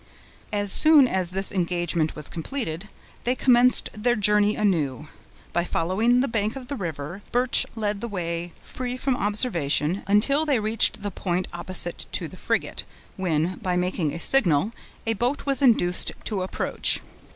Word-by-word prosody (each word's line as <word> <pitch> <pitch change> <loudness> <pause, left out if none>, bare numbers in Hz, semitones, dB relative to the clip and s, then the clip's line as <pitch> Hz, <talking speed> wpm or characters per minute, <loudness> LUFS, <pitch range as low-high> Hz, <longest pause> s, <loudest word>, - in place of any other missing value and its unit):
As 205 -1 +2
soon 310 -1 +6
as 185 -5 0
this 190 +2 -3
engagement 175 -3 -1
was 150 -1 -6
completed, 180 - -5 0.4
they 250 +2 0
commenced 250 -1 +5
their 240 +3 0
journey 210 0 +3
anew. 155 -8 -1 0.4
By 175 - +1
following 205 +9 +1
the 270 - 0
bank 220 -1 -1
of 260 -2 -9
the 285 - -3
river, 170 - -6
Birch 250 +1 +3
led 210 -2 -2
the 235 - -3
way 170 -4 -4
free 250 0 -5
from 265 0 0
observation, 190 - 0
until 235 +10 +3
they 285 -6 +1
reached 215 -1 +2
the 205 - -3
point 180 0 -2
opposite 175 0 -3
to - - 0
the - - -12
frigate, - - -2 0.3
when, 175 -1 -1
by 180 -1 -2
making 180 -4 -1
a 170 - -6
signal, 190 - +2 0.3
a 225 - +1
boat 245 +7 -2
was 275 0 +1
induced 220 -9 +3
to 205 -4 -2
approach. 185 - -1
200 Hz, 160 wpm, -24 LUFS, 175-240 Hz, 0.4 s, soon